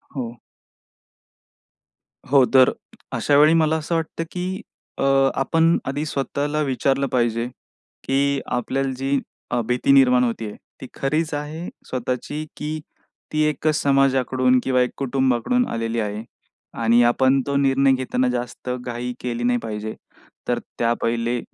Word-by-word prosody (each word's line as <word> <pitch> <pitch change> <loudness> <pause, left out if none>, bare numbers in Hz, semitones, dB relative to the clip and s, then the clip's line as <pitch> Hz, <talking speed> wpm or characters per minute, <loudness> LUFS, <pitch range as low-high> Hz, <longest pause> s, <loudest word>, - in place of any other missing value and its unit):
हो. 120 -3 -5 1.9
हो, 140 -2 +7
तर 130 -1 +7 0.4
अशावेळी 150 +2 +4
मला 160 -1 +3
असं 160 +2 -2
वाटतं, 165 0 -2
की 185 +1 -4 0.4
अ, - - -1 0.4
आपण 165 +4 +3
आधी 145 +3 -2
स्वतःला 145 +1 -2
विचारलं 135 0 0
पाहिजे, 120 -2 0 0.6
की 140 +1 +1
आपल्याला 135 +2 -1
जी 135 +1 0 0.3
अ, 120 - +1
भीती 125 +3 +1
निर्माण 125 -2 +6
होते 115 -2 -2
आहे 105 - -8 0.3
ती 130 - -7
खरीच 155 +3 -1
आहे 150 +4 -4 0.2
स्वतःची? 130 +4 -3
की 155 +1 -4 0.5
ती 155 0 0
एकच 155 0 0
समाजाकडून 130 -2 +3
किंवा 130 -1 +2
एक 125 - +2
कुटुंबाकडून 135 - +1
आलेली 115 0 -2
आहे. 105 0 -3 0.6
आणि 115 +1 +4
आपण 130 +3 +3
तो 140 - -1
निर्णय 135 0 +3
घेताना 130 0 0
जास्त 125 +1 -4
घाई 125 0 -4
केली 120 -1 -3
नाही 120 0 +2
पाहिजे. 110 -1 -5 0.5
तर - - +1 0.2
त्या 115 0 +2
पहिले 115 +1 0
130 Hz, 135 wpm, -22 LUFS, 120-145 Hz, 1.9 s, हो